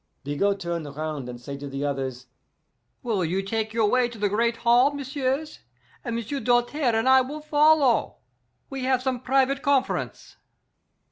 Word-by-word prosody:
Bigot 195 +9 0
turn 170 -3 -3
round 145 -2 -5
and 120 -1 -8
say 140 +3 -7
to 140 +1 -7
the 135 +1 -4
others, 135 -3 -3 0.8
'Will 220 -7 0
you 185 +4 -1
take 220 +2 -2
your 225 -1 +2
way 250 +2 +2
to 235 - -11
the 205 -1 0
great 230 +3 +1
hall, 245 +4 +5
messieurs, 280 +1 -3 0.4
and 235 -3 -3
M'sieu' 235 +5 -3
Doltaire 245 +2 +1
and 225 +3 +1
I 260 0 +7
will 285 +4 -5
follow. 300 -4 +3 0.5
We 270 -1 -6
have 260 -1 +1
some 260 -2 -1
private 270 +2 +1
conf'rence. 280 -2 -1
235 Hz, 160 wpm, -25 LUFS, 175-265 Hz, 0.8 s, I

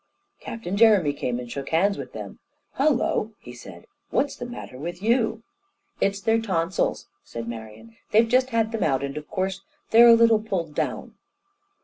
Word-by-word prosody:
Captain 210 -5 -5
Jeremy 200 -9 +5
came 135 -4 -3
and 120 -1 -7
shook 140 -1 -5
hands 195 +5 +2
with - - -8
them. - - -8 0.4
"Hullo," 255 -6 +1
he - - -11
said, - - -12 0.2
"what's 285 +1 0
the 245 - -7
matter 185 - -9
with 170 +4 -6
you?" 225 +1 +1 0.6
"It's 200 0 0
their 225 +2 +1
tonsils," 185 -4 -1 0.2
said 115 0 -7
Marian. 110 0 -9
"They've 225 +2 +4
just 255 +2 +2
had 225 -2 0
them 225 -2 -3
out, 135 -5 +1
and 140 0 -4
of 150 0 -7
course 190 +1 -2 0.3
they're 235 +1 +8
a 230 - +9
little 230 -2 +4
pulled 180 -8 -3
down." - - -3
200 Hz, 170 wpm, -24 LUFS, 150-230 Hz, 0.6 s, a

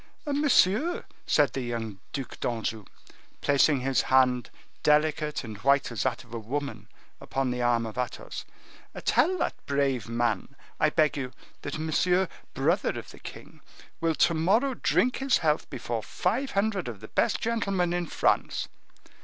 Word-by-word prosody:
"Monsieur," 290 - +3 0.2
said 145 -2 +3
the 135 - -2
young 115 -5 -4
Duc 135 -3 -5
d'Anjou, 110 -3 -2 0.6
placing 140 -1 +3
his 130 -1 +2
hand, 130 -2 +3 0.3
delicate 150 0 +2
and 110 -3 -8
white 140 +2 +3
as 115 - -3
that 130 -2 -1
of 120 -2 -16
a 115 - -3
woman, 140 +6 -4 0.3
upon 135 -2 -1
the 125 0 -2
arm 120 -1 +2
of 110 +2 -6
Athos, 125 - -4 0.6
"tell 370 +1 +3
that - - -2
brave 135 -5 0
man, 115 +1 -1 0.2
I 155 - +4
beg 155 -1 +2
you, 130 -3 -4 0.3
that 145 - -4
Monsieur, 180 +4 +2 0.3
brother - - +1
of - - -8
the - - -14
king, - - -11 0.4
will 165 -1 +1
to 170 - +4
morrow 205 +12 +2
drink 250 +1 +1
his 270 -1 +3
health 155 -1 0
before 115 -2 -3
five 235 - -1
hundred 200 - 0
of 115 -4 -6
the 110 - -8
best - - +1
gentlemen 195 -6 0
of 175 -2 -2
France." - - +1
140 Hz, 155 wpm, -28 LUFS, 120-180 Hz, 0.6 s, I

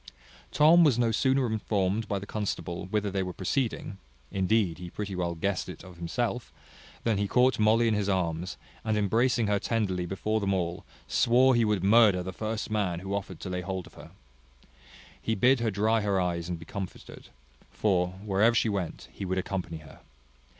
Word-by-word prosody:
Tom 165 +3 +6
was 140 -7 +4
no 120 -2 +2
sooner 130 +3 +2
informed 105 -2 -1
by 100 - -1
the 100 - -6
constable 100 -4 -4
whither 105 0 -1
they 95 0 -1
were 90 -1 -4
proceeding 105 0 -2 0.3
(indeed 95 -2 +1
he 90 -1 -7
pretty 100 +1 -5
well 85 -1 -2
guessed 95 +3 -2
it - - -9
of 90 -1 -13
himself), 120 +8 -3 0.5
than 110 -4 +1
he 100 - 0
caught 125 +3 +3
Molly 110 +2 +4
in 110 - +2
his 105 -1 0
arms, 90 -2 -1 0.3
and 110 -1 0
embracing 115 +3 +2
her 100 -1 +1
tenderly 95 -5 -1
before 105 +4 -1
them 100 -2 0
all, 85 -1 -3 0.2
swore 125 - +4
he 120 -1 +3
would 105 -4 +1
murder 100 -3 +5
the 95 +1 -6
first 110 +2 -4
man 95 -5 -1
who 95 +1 -5
offered 100 -3 -4
to - - -5
lay 90 0 -2
hold 95 0 -4
of - - -16
her. - - -12 1.1
He 110 - -1
bid 125 +5 +4
her 115 -1 0
dry 110 +2 +1
her 100 -2 +1
eyes 85 -1 -1
and 90 - -2
be 80 - -11
comforted; 95 +2 -8 0.4
for, 90 - +1 0.2
wherever 105 +4 +3
she 115 - +2
went, 95 -5 -4
he - - -8
would 95 0 -2
accompany 90 -3 -3
her. 70 - -14
100 Hz, 190 wpm, -28 LUFS, 90-110 Hz, 1.1 s, Tom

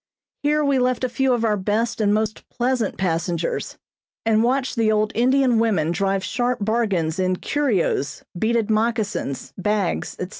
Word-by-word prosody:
Here 300 0 +2
we 275 -2 +2
left 250 0 0
a 255 - +1
few 265 +1 +1
of 235 -2 +1
our 215 -2 +2
best 220 +4 -1
and 205 -1 +3
most 215 +1 -1
pleasant 245 -3 -1
passengers, 170 -2 -2 0.5
and 220 -1 +3
watched 260 +3 0
the 225 -2 +2
old 215 0 +1
Indian 255 0 +3
women 190 -9 +1
drive 195 +1 0
sharp 245 +5 -1
bargains 195 -7 0
in 185 0 +1
curios, 210 - -1
beaded 220 +3 0
moccasins, 215 - -1
bags, 205 -1 -1
etc. 180 - -5
220 Hz, 155 wpm, -22 LUFS, 195-245 Hz, 0.5 s, and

